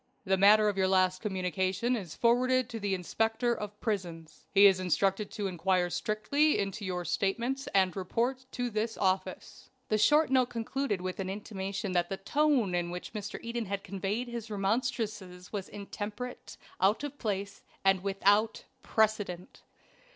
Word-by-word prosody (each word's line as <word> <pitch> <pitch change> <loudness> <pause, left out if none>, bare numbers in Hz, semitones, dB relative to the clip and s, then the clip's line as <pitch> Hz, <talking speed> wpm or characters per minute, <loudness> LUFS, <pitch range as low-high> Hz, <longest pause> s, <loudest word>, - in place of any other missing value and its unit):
"The 190 0 +3
matter 210 +3 +6
of 200 -2 0
your 190 - +3
last 185 -1 +2
communication 190 +4 0
is 185 -8 -6
forwarded 255 +1 +3
to 230 -2 -5
the 200 -2 0
'Inspector 225 +6 0
of 210 -2 -6
Prisons.' 170 -8 -4
He 200 +1 +7
is 190 -2 +6
instructed 195 +3 +1
to 210 -3 -4
inquire 180 -1 +1
strictly 215 - +1
into 200 +1 -3
your 180 -2 -3
statements 235 - -1
and 190 -2 +2
report 240 +7 -1
to 245 -1 -2
this 220 +1 -2
office." 190 -1 -2 0.2
The 215 - +2
short 300 +6 +4
note 255 -2 +3
concluded 230 -3 -2
with 185 +1 -4
an 190 -1 -2
intimation 195 -1 -4
that 175 -1 +1
the 195 - -3
tone 265 -2 +2
in 175 -1 0
which 180 +3 -7
Mr. 210 0 -5
Eden 235 0 -3
had 200 0 -3
conveyed 200 +5 -3
his 235 -2 -6
remonstrances 205 -3 -2
was 200 -2 -4
intemperate, 210 +4 -7 0.2
out 200 +8 +3
of 290 0 -6
place, 200 -2 -3 0.2
and 195 -1 +4
WITHOUT 200 +3 +2 0.2
PRECEDENT. 205 -5 -1
205 Hz, 160 wpm, -30 LUFS, 190-230 Hz, 0.2 s, He